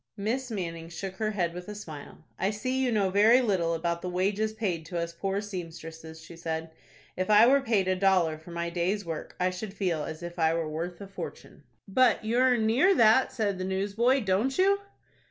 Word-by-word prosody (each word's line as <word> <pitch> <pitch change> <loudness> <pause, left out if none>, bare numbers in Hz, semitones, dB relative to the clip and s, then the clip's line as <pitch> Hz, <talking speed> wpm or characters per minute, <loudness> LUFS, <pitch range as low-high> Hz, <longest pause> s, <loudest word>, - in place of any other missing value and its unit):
Miss 245 +6 -2
Manning 165 -6 -5
shook 190 +3 -6
her 215 +1 0
head, 180 -5 -1
with 180 0 -8
a 210 - -6
smile. 160 -6 -10 0.2
"I 190 - +1
see 255 +5 -1
you 250 - +1
know 200 -4 +1
very 215 +5 +6
little 185 -9 +1
about 170 +1 -2
the 180 - -4
wages 200 +4 0
paid 195 -7 -2
to 175 - -4
us 170 0 -3
poor 195 +3 -2
seamstresses," 165 -4 -8
she 160 +1 -12
said. 165 -1 -4 0.4
"If 185 +2 -2
I 210 +2 +7
were 275 +3 +5
paid 220 -7 +1
a 185 - +2
dollar 185 -5 +2
for 160 - -14
my 170 0 -3
day's 185 +4 -1
work 165 -2 -6
I 180 0 +1
should 195 +2 -7
feel 175 -6 -1
as 160 +2 -7
if 175 0 -7
I 160 0 +3
were 165 -1 -1
worth 165 +3 -5
a 200 - -7
fortune." 195 - -9 0.2
"But 245 +2 +3
you 230 +2 0
earn 250 -3 +3
near 270 - +4
that," 230 +1 +5
said 205 -5 -1
the - - -2
newsboy, 205 +8 +1
"don't 210 +6 0
you?" 395 +2 +4
190 Hz, 210 wpm, -28 LUFS, 170-220 Hz, 0.4 s, I